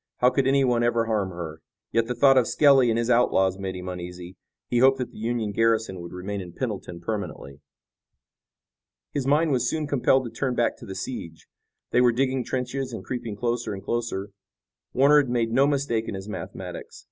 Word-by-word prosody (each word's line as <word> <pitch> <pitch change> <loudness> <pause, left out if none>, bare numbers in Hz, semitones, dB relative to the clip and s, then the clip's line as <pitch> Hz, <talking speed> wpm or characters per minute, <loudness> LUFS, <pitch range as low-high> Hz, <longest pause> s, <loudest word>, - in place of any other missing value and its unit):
How 125 +1 +4
could 135 -1 +1
anyone 135 -3 +3
ever 120 -1 +2
harm 105 -4 0
her! 80 -3 -7 0.3
Yet 115 0 +1
the 125 - -2
thought 135 +2 +5
of 125 -3 +4
Skelly 135 -4 +5
and 115 - +1
his 115 +1 0
outlaws 95 -6 +3
made 95 -1 -4
him 90 0 -7
uneasy. 90 0 -7 0.3
He 120 - +1
hoped 135 +1 +5
that 125 -2 -4
the - - -12
Union 115 -1 -1
garrison 110 -4 +1
would 85 - -8
remain 95 +2 -5
in 90 -2 -9
Pendleton 95 -7 -5
permanently. 85 -8 -5 1.5
His 135 -2 -2
mind 150 +3 +3
was 125 -3 +1
soon 155 -1 -2
compelled 135 -2 +2
to 115 - -6
turn 125 +2 -2
back 120 - +1
to 115 - -12
the 95 - -6
siege. 85 -6 -6 0.5
They 125 - +4
were 125 -1 +5
digging 130 +1 0
trenches 130 +2 -3
and - - -7
creeping 120 -4 -4
closer 120 -1 -2
and 95 - -9
closer. 105 -4 -3 0.6
Warner 140 +3 +5
had 135 - -5
made 115 -2 0
no 135 +4 +4
mistake 135 -6 0
in - - -4
his 95 +1 -7
mathematics. 105 -3 -7
115 Hz, 195 wpm, -25 LUFS, 95-130 Hz, 1.5 s, thought